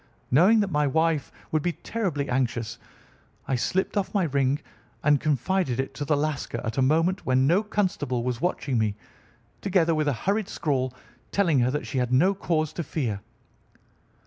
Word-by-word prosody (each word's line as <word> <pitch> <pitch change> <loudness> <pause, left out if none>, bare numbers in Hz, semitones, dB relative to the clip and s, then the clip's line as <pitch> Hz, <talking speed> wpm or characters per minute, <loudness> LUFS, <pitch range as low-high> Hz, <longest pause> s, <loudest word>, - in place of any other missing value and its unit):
Knowing 185 - +6
that 200 -2 -1
my 150 -1 +2
wife 160 -1 +1 0.2
would 155 - +2
be 175 +3 0
terribly 170 -12 -2
anxious, 115 -3 -1 0.7
I - - -1
slipped 185 - 0
off 200 0 -1
my 200 - +3
ring 140 -2 +1 0.4
and 145 -1 +4
confided 150 -1 0
it 135 0 -2
to 145 - -4
the 150 0 +2
Lascar 145 -5 -2
at 110 +3 -2
a - - +4
moment 165 +7 +2
when 130 0 +2
no 175 +8 +4
constable 180 - -1
was 125 -2 -2
watching 140 -8 0
me, 105 -2 0 0.7
together 180 -4 +2
with 155 -1 0
a 145 - +2
hurried 200 - -1
scrawl, 130 -5 -1 0.4
telling 170 -9 +3
her 120 0 +3
that 150 +3 -2
she 135 - -2
had 125 -1 -1
no 175 +10 +4
cause 160 -5 -1
to 170 - -3
fear." 115 -11 -2
150 Hz, 175 wpm, -26 LUFS, 130-175 Hz, 0.7 s, Knowing